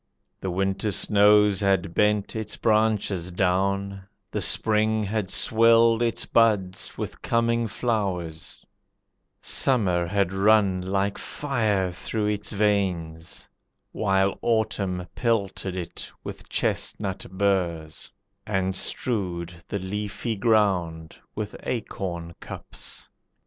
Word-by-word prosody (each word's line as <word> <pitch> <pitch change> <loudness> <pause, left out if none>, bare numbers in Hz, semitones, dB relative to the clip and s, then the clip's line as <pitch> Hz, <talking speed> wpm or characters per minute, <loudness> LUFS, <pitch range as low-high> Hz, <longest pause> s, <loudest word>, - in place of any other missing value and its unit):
The 95 - -3
winter 95 +3 -1
snows 105 0 +4
had 95 -3 +1
bent 105 +2 +1
its 110 -1 -4
branches 105 -5 +1
down, 100 +2 0 0.3
The - - -2
spring 110 0 +2
had 105 -1 -2
swelled 115 +1 +4
its 115 -1 0
buds 105 -5 +2
with - - -6
coming 115 0 +1
flowers, 90 -8 -3 0.8
Summer 95 -10 +2
had 95 0 0
run 100 -1 +3
like 100 +2 -1
fire 110 -10 -1
through 105 +4 -2
its 105 0 -2
veins, 90 -6 -1 0.4
While 95 -1 +1
autumn 100 -5 0
pelted 100 -5 -1
it 85 -1 -6
with - - -8
chestnut 95 -3 -1
burrs, 90 -5 -1 0.4
And 95 -2 0
strewed 90 -6 -2
the 100 - -2
leafy 105 +4 -3
ground 95 -7 +1 0.2
with 105 -1 -4
acorn 90 -7 -4
cups. - - -9
100 Hz, 100 wpm, -25 LUFS, 90-110 Hz, 0.8 s, snows